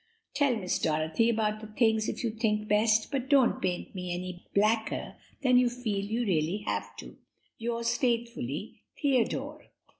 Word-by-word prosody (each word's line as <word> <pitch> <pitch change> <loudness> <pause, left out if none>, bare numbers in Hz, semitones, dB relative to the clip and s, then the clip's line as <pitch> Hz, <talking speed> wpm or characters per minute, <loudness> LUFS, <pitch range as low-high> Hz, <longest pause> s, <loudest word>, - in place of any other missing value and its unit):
Tell 280 -4 +2
Miss 185 -5 -1
Dorothy 160 +7 +1
all 235 - +2
about 215 0 -2
things 220 -2 +3
if - - -4
you 230 - 0
think 215 -1 0
best, 215 +2 +3
but 265 -2 -2
don't 275 -4 +4
paint 180 -1 -2
me 180 -2 -4
any 180 0 -5
blacker 220 +2 +1 0.3
than 255 -2 +5
you 250 -1 +3
feel 225 -5 -2
you 225 +4 -1
really 180 +2 0
have - - -3
to. - - -10 0.4
"'Yours 235 0 -1
faithfully, 230 - -2 0.2
"'Theodore.'" 270 -6 0
220 Hz, 155 wpm, -29 LUFS, 195-235 Hz, 0.4 s, than